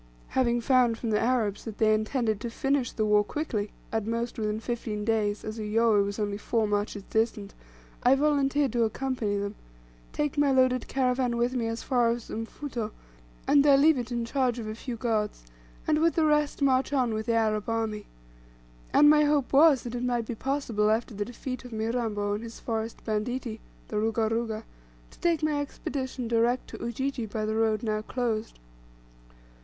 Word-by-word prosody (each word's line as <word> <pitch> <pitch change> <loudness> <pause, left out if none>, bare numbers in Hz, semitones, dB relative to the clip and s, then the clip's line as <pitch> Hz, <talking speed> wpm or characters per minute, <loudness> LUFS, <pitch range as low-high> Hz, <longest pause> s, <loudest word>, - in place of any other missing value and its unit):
Having 240 -2 +1
found 245 -2 +3
from 230 -1 -3
the 210 - +2
Arabs 225 -4 0
that 220 -2 -7
they 215 -1 +4
intended 215 -1 0
to 235 - -3
finish 270 +1 0
the 215 - -1
war 210 0 +4
quickly 215 -5 -3 0.2
at 220 -1 -1
most 230 +1 -2
within 215 0 -1
fifteen 220 -3 -4
days, 215 -2 0
as 215 +1 -5
Uyoweh 215 -1 +3
was 200 0 -4
only 205 -1 -2
four 225 0 0
marches 205 0 -2
distant 220 -2 0 0.5
I 250 +2 +5
volunteered 280 -2 +2
to 240 -1 +2
accompany 225 -3 -1
them, 200 0 -3 0.6
take 295 -1 -1
my 290 -1 +4
loaded 255 -1 +3
caravan 250 -2 0
with 240 +2 +1
me 235 -3 -1
as 225 0 -4
far 245 -3 +2
as 235 0 -3
Mfuto, 225 0 -4 0.6
and 285 -1 +5
there 285 -2 +6
leave 310 +3 +5
it 245 0 -5
in 235 -1 -1
charge 250 -1 0
of 230 - -5
a 215 - -4
few 235 +2 -6
guards, 220 - -1 0.4
and 305 - +2
with 330 +1 +3
the 320 - +3
rest 300 -1 +2
march 265 0 +2
on 255 -5 +1
with 220 +1 -3
the 230 - +2
Arab 215 -1 +1
army. 220 -2 -2 0.8
And 295 - +6
my 300 0 +6
hope 290 -3 +1
was, 285 -1 +6
that 240 - -6
it 245 - -3
might 240 -2 0
be 240 - -4
possible, 230 -4 0
after 225 +2 0
the 205 0 -3
defeat 255 +2 -6
of 250 - -10
Mirambo, 220 -2 -1
and 210 +2 -3
his 230 0 -9
forest 225 -1 -4
banditti 225 +1 -2 0.3
the 210 - -2
Ruga 220 0 +1
Ruga 225 -1 -2 0.5
to - - -18
take 335 -2 +1
my 300 -1 +1
Expedition 260 -3 -4
direct 235 +2 +1
to - - -8
Ujiji 240 0 -2
by 215 +1 -3
the 215 - -1
road 220 -1 +1
now 215 -1 -1
closed. 225 -1 -3
230 Hz, 190 wpm, -28 LUFS, 215-260 Hz, 0.8 s, there